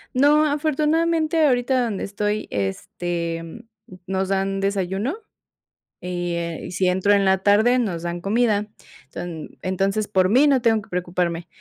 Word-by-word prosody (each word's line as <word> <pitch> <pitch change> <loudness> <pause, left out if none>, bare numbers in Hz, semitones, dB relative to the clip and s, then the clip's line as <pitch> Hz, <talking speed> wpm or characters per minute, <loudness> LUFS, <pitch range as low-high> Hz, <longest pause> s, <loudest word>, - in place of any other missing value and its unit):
No, 295 +4 +5
afortunadamente, 310 +2 +1
ahorita 250 0 +2
donde 210 -4 -3
estoy, 210 +1 -2
este, 165 - -4 0.4
nos 190 0 -2
dan 195 0 0
desayuno. 195 - -1 0.9
Eh, 175 -2 -3
y - - -7
si 185 0 0
entro 190 +3 +2
en 200 -1 +3
la 190 0 +3
tarde 215 +6 +4
nos 180 -8 -2
dan 175 0 -4
comida. 210 +1 +1 0.5
Enton 165 -3 -7
entonces 195 +3 -1
por 185 -2 +2
mí, 260 +8 +5
no 270 -3 +3
tengo 225 -2 +2
que - - -18
preocuparme. 175 -1 -2
195 Hz, 140 wpm, -22 LUFS, 180-245 Hz, 0.9 s, No